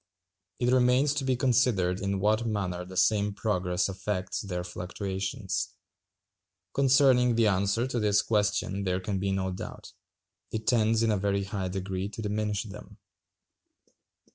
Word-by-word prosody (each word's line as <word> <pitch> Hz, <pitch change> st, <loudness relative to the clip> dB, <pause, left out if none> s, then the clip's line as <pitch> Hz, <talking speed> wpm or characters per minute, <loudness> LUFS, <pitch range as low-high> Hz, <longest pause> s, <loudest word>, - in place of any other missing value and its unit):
It 125 Hz, 0 st, +1 dB
remains 130 Hz, +3 st, +4 dB
to 145 Hz, -1 st, -2 dB
be 130 Hz, -1 st, +1 dB
considered 120 Hz, -8 st, +2 dB
in 100 Hz, -1 st, -1 dB
what 110 Hz, +4 st, +1 dB
manner 95 Hz, -5 st, -2 dB
the 95 Hz, +1 st, -9 dB
same 100 Hz, +2 st, +2 dB
progress 90 Hz, -4 st, 0 dB
affects 95 Hz, 0 st, -3 dB
their 90 Hz, -3 st, -4 dB
fluctuations. 95 Hz, +1 st, -4 dB, 1.0 s
Concerning 130 Hz, -3 st, +4 dB
the 115 Hz, -1 st, +3 dB
answer 100 Hz, +3 st, +2 dB
to 130 Hz, -2 st, -2 dB
this 105 Hz, -1 st, +3 dB
question 105 Hz, -2 st, 0 dB
there 90 Hz, -1 st, 0 dB
can 95 Hz, +1 st, -3 dB
be 100 Hz, +1 st, -1 dB
no 95 Hz, -1 st, -1 dB
doubt. 90 Hz, -, -8 dB, 0.6 s
It 110 Hz, 0 st, -4 dB
tends 115 Hz, -1 st, +3 dB
in 115 Hz, -, +2 dB
a 105 Hz, -, +2 dB
very 100 Hz, 0 st, 0 dB
high 95 Hz, -1 st, -3 dB
degree 95 Hz, +1 st, -3 dB
to 110 Hz, -, -7 dB
diminish 105 Hz, 0 st, -1 dB
them. 105 Hz, -1 st, -11 dB
105 Hz, 145 wpm, -28 LUFS, 95-115 Hz, 1.0 s, remains